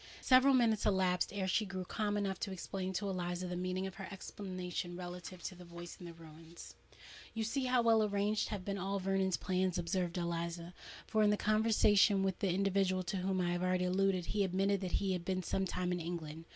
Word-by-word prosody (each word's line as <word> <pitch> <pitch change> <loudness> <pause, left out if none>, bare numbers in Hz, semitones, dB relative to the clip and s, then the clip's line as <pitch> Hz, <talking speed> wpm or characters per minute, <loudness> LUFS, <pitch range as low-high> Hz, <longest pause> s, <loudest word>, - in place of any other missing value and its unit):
Several 260 +1 +6
minutes 225 -4 +3
elapsed 185 -3 +2
ere 195 -2 -2
she 200 +4 +2
grew 190 -2 -5
calm 210 +1 -1
enough 195 -2 -1
to 200 - -3
explain 190 0 -4
to 200 +2 -2
Eliza 180 -1 -2
the 180 - -3
meaning 185 +1 -2
of 190 - -5
her 195 -2 -6
exclamation 185 -3 -5
relative 180 0 -7
to - - -4
the 180 0 -12
voice 170 0 -9
in 175 - -8
the 170 - -8
ruins. 165 +1 -12 0.6
"You 225 - -1
see 260 +4 -1
how 250 -1 +3
well 225 -1 +5
arranged 205 +1 0
have 200 -3 -4
been 200 0 -2
all 195 +2 -1
Vernon's 190 -1 +1
plans," 185 -1 0
observed 175 0 -1
Eliza; 170 0 -3 0.3
"for, 220 - +1
in 210 - +5
the 210 - +3
conversation 210 -2 +4
with 190 -2 -1
the 195 - +1
individual 190 0 +1
to 185 +2 -3
whom 190 0 0
I 175 -1 +1
have 175 0 -1
already 185 0 +1
alluded, 185 -1 +1
he 205 +2 0
admitted 195 +1 +1
that 185 -2 -4
he 195 -1 +1
had 180 -2 -3
been 185 0 -1
some 190 +2 0
time 180 0 -2
in 180 - -1
England. 165 -1 -5
185 Hz, 215 wpm, -35 LUFS, 180-200 Hz, 0.6 s, Several